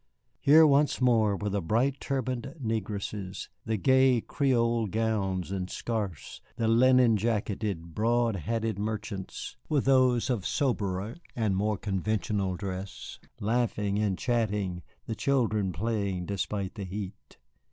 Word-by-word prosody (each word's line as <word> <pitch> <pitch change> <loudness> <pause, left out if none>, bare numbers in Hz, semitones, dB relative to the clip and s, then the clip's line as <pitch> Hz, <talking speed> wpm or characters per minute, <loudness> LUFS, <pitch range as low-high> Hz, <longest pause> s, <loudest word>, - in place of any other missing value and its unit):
Here 155 +3 +7
once 145 0 +3
more 115 -5 +3
were 105 +1 -2
the 100 0 0
bright 125 +10 +1
turbaned 130 -1 -3
negresses, 105 -4 -4 0.2
the 110 0 +1
gay 130 +2 +4
Creole 115 -3 +1
gowns 100 -4 -1
and 95 -2 -3
scarfs, 105 -8 -4
the 115 -1 0
linen 120 0 +5
jacketed, 100 -5 -2
broad 115 +1 +2
hatted 110 +2 -2
merchants, 105 +1 -5
with 150 -4 +1
those 130 -2 +4
of 115 -7 -1
soberer 105 -6 -1 0.2
and 110 -5 +1
more 105 +2 0
conventional 100 -1 -1
dress, 95 +1 -6 0.2
laughing 105 -2 0
and 100 -3 0
chatting, 105 -7 -1 0.2
the 115 - -3
children 110 -4 +1
playing 100 -1 -2
despite 100 0 -3
the 105 - -6
heat. 95 +1 -7
110 Hz, 125 wpm, -29 LUFS, 100-120 Hz, 0.2 s, Here